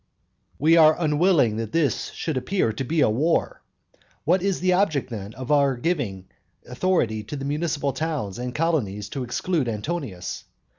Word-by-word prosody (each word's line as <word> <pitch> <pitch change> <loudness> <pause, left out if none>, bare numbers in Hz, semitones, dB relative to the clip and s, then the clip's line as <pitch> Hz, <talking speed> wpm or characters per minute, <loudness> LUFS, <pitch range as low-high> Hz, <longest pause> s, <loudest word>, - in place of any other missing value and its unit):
II. - - -42
We 160 +4 +4
are 155 -1 +7
unwilling 150 - +3
that 115 -1 -4
this 165 -4 +1
should 160 - -3
appear 130 - 0
to 120 - -3
be 155 +5 0
a - - +4
war. 155 +9 0 0.6
What 180 +4 +2
is 195 -1 0
the 185 0 +2
object, 160 -9 +1
then, 105 -2 -6
of 130 +3 -5
our 140 -3 +3
giving 120 - -2 0.4
authority 125 -7 0
to 145 - -6
the 140 -1 -5
municipal 145 -1 -1
towns 135 -9 -3
and 125 0 -4
colonies 110 - -1
to 135 +2 -4
exclude 140 +2 -1
Antonius? 110 - -4
140 Hz, 165 wpm, -24 LUFS, 115-165 Hz, 0.6 s, are